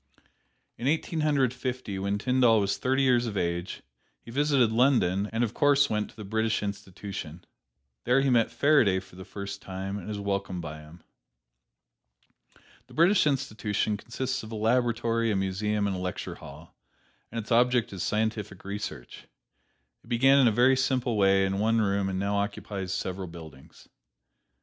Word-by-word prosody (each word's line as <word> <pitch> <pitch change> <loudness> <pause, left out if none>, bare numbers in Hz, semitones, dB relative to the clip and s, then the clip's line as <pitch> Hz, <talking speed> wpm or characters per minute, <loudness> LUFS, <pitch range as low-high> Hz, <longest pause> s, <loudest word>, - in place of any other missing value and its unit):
In 125 - -2
Eighteen 160 +2 0
Hundred 140 -5 +2
Fifty, 125 -5 -4
when 100 +1 -1
Tyndall 125 0 +3
was 100 -1 0
thirty 130 +1 +1
years 125 -2 +3
of 105 -3 -4
age, 85 0 -3 0.4
he 115 - -12
visited 140 -3 +2
London, 110 -5 +2
and 115 +1 0
of 115 -1 -2
course 140 -2 +3
went 105 -1 -1
to - - -18
the 105 - -8
British 110 +1 0
Institution. 100 -4 -6 0.6
There 125 +3 +4
he 135 -1 +2
met 115 -2 +3
Faraday 130 -11 +3
for 95 -1 -16
the 95 - -9
first 100 +1 -7
time 95 +1 -5
and 90 - -10
was 105 -1 -4
welcomed 100 -3 -3
by 75 -1 -7
him. 75 +3 -15 1.8
The - - -16
British 175 +1 +4
Institution 110 -6 -1
consists 130 +5 -4
of 110 - -10
a - - -5
laboratory, 115 0 +1
a 105 - +1
museum 100 +2 -1
and 100 -1 -1
a - - -4
lecture 90 0 -4
hall, - - -13 0.6
and 115 - -6
its 110 - -8
object 120 -1 +3
is 95 - -5
scientific 105 -3 -2
research. 100 -11 -7 0.8
It - - -21
began 135 +4 +4
in 130 - +5
a - - +4
very 125 +4 +4
simple 130 -3 0
way 95 -1 +4
in 95 0 -1
one 115 +2 +2
room 100 -2 +1
and 95 - -3
now 100 +1 0
occupies 100 -2 -3
several 95 0 -3
buildings. 80 -5 -13
105 Hz, 170 wpm, -27 LUFS, 95-125 Hz, 1.8 s, in